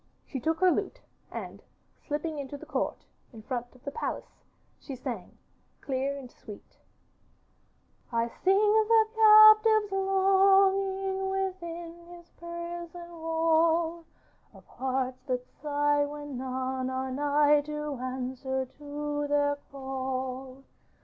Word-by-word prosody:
She 270 - -5
took 320 +6 -1
her 370 -1 +6
lute, - - -2 0.3
and - - -7 0.5
slipping 300 +1 -3
into 280 +1 -6
the - - -12
court - - -3 0.3
in 225 -3 -12
front 245 0 -4
of 255 - -20
the 280 - -5
palace - - -5 0.4
she 275 - -8
sang, 255 - -7 0.4
clear 275 +1 -2
and 255 -3 -10
sweet: 210 -3 -13 1.3
'I 230 0 +1 0.2
sing 380 +1 +5
the 435 +2 +4
captive's 430 -1 +7
longing 385 0 +3
Within 345 -3 -5
his 345 0 -18
prison 340 0 -8
wall, 330 0 +1 0.5
Of - - -16
hearts 260 -1 -3
that 250 -1 -2
sigh 290 0 0
when 290 -1 -7
none 260 0 -3
are 260 0 -3
nigh 290 +2 +3
To 300 -2 -4
answer 260 +1 -3
to 290 +2 -5
their 285 0 +1
call. 265 -1 -5
295 Hz, 115 wpm, -28 LUFS, 265-355 Hz, 1.3 s, captive's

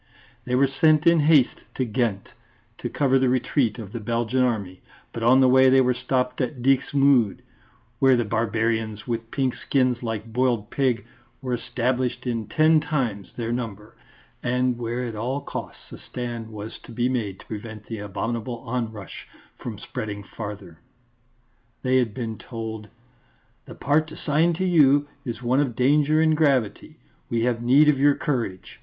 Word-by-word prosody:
They 125 - 0
were 135 +2 +5
sent 150 +3 +3
in 170 -1 +5
haste 150 -4 +4
to 130 - 0
Ghent 110 -3 -1 0.5
to - - -4
cover 135 -2 +2
the 130 -1 +2
retreat 125 -2 +1
of 105 -5 -8
the 115 - -5
Belgian 115 +3 0
Army, 100 -7 -1 0.3
but 115 - -5
on 130 +3 +5
the 130 - +6
way 130 +1 +6
they 135 +1 +5
were 125 -1 +3
stopped 125 +1 -1
at 125 0 -3
Dixmude, 135 -4 +3 0.6
where 135 -1 +5
the 120 - 0
barbarians 110 0 -1
with 115 -2 -4
pink 130 -2 0
skins 125 -3 0
like 115 -1 -5
boiled 120 -4 0
pig 130 -6 0 0.3
were 130 -2 -3
established 125 +2 -2
in 115 -4 -2
ten 155 +7 +4
times 130 -10 -2
their 115 -1 -2
number, 110 -4 -5 0.5
and 125 0 0
where 120 +1 -3
at 115 - -5
all 125 +6 -2
costs - - -8
a - - -9
stand 120 -2 -6
was 105 +1 -8
to - - -14
be 120 +1 0
made 110 -7 -2
to - - -14
prevent 110 -1 -8
the 115 -2 -6
abominable 115 +4 -4
onrush 115 -5 -5 0.3
from - - -6
spreading 105 -2 -6
farther. 100 -5 -8 1.0
They 130 0 +3
had 120 -4 +1
been 115 -4 -4
told: 110 -2 -6 0.8
"The - - -11
part 155 +3 +1
assigned 160 +3 +1
to 185 +3 -1
you 145 -5 +4 0.2
is 120 0 -5
one 125 +3 +2
of 135 -5 0
danger 150 +4 +3
and 160 -1 +4
gravity; 135 -9 0 0.3
we 115 -1 0
have 120 -1 0
need 135 +5 +5
of 145 -3 +4
your 145 0 +5
courage. 115 -10 -3
125 Hz, 165 wpm, -24 LUFS, 110-135 Hz, 1.0 s, the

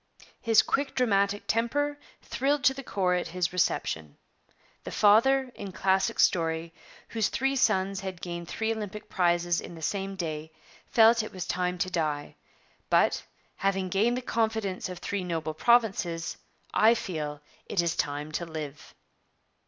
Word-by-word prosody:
His 225 -2 +5
quick 280 0 -1
dramatic 205 -4 +2
temper 290 +6 0 0.2
thrilled 280 +1 0
to 265 - +5
the 275 - -7
core 190 -7 0
at 180 - 0
his 180 0 -2
reception. 80 - -1 0.7
'The - - -6
father, 255 +5 +4
in 200 -2 -7
classic 190 +1 +1
story, 165 -1 +2 0.4
whose 225 -2 0
three 270 +2 0
sons 195 -6 +2
had 190 -3 -6
gained 170 -1 -6
three 220 +4 -1
Olympic 210 -1 -7
prizes 175 -1 +1
in 175 - -9
the 165 - -11
same 195 +2 -2
day, 160 -3 -5 0.3
felt 230 0 +5
it 215 - -7
was 185 -2 -5
time 180 0 -1
to 185 +1 -1
die. 150 -4 -2 0.5
But, - - +3 0.4
having 195 -1 0
gained 220 +7 +2
the 255 - -4
confidence 220 -6 -1
of 180 - -6
three 195 +2 -3
noble 160 -3 -3
provinces, 190 -5 +2 0.4
I 225 +2 +5
feel 150 -8 -4 0.3
it 195 - -2
is 170 -1 +2
time 145 +1 -2
to 170 +3 -3
live.' 155 -3 -7
190 Hz, 155 wpm, -28 LUFS, 170-225 Hz, 0.7 s, His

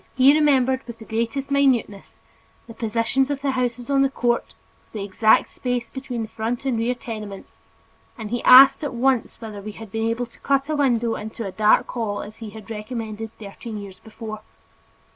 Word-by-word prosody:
He 265 +2 +6
remembered 265 -4 +3
with 235 -1 -8
the 220 - -12
greatest 235 +6 -2
minuteness 255 -8 +1 0.5
the 230 - -11
positions 230 +4 0
of 285 -1 -2
the 275 - +1
houses 245 -2 -2
on 275 -1 +2
the 275 - +3
court, 240 -3 -1 0.3
with - - -34
the 210 -3 -4
exact 210 +3 +3
space 245 -2 -3
between 255 -3 -4
the - - -5
front 225 +4 -4
and 250 -4 0
rear 240 +2 0
tenements, 215 -5 -8 0.6
and 220 -2 -7
he 240 - -1
asked 265 +4 +8
at 285 - -3
once 255 0 +1
whether 215 -3 -8
we 210 +1 -7
had 220 -1 -11
been 225 +1 -1
able 235 +2 -1
to - - -22
cut 275 +1 0
a 310 - 0
window 240 -5 +2
into 220 +1 -6
a 195 - -4
dark 215 +2 +3
hall 220 -4 -3
as 215 +2 -11
he 225 -2 -8
had 220 +1 -11
recommended 220 0 -5
thirteen 215 +1 -8
years 195 -2 -9
before. 215 -1 -8
230 Hz, 195 wpm, -23 LUFS, 220-260 Hz, 0.6 s, asked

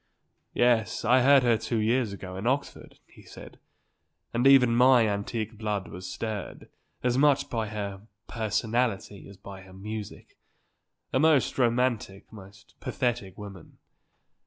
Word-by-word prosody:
"Yes; 120 -2 +1
I 125 +3 +4
heard 135 +1 +5
her 115 -3 +2
two 115 +1 -3
years 115 +1 +1
ago 95 -2 -8
in 100 +5 -4
Oxford," 140 +3 -3
he - - -19
said; - - -13 0.7
"and 120 +3 +2
even 125 -4 +6
my 125 -1 +5
antique 110 +2 -4
blood 105 -3 -3
was 90 +1 -8
stirred, 110 -4 -6 0.3
as 125 +1 +1
much 145 -1 +3
by 115 -2 -2
her 100 -2 -5 0.3
personality 110 -2 -2
as 100 - -14
by 95 0 -11
her 95 0 -15
music. 105 +2 -8 0.7
A 130 - +2
most 155 -3 +2
romantic, 120 -5 -1
most 100 -1 -15
pathetic 120 -7 -3
woman. 100 -4 -11
110 Hz, 135 wpm, -27 LUFS, 100-125 Hz, 0.7 s, even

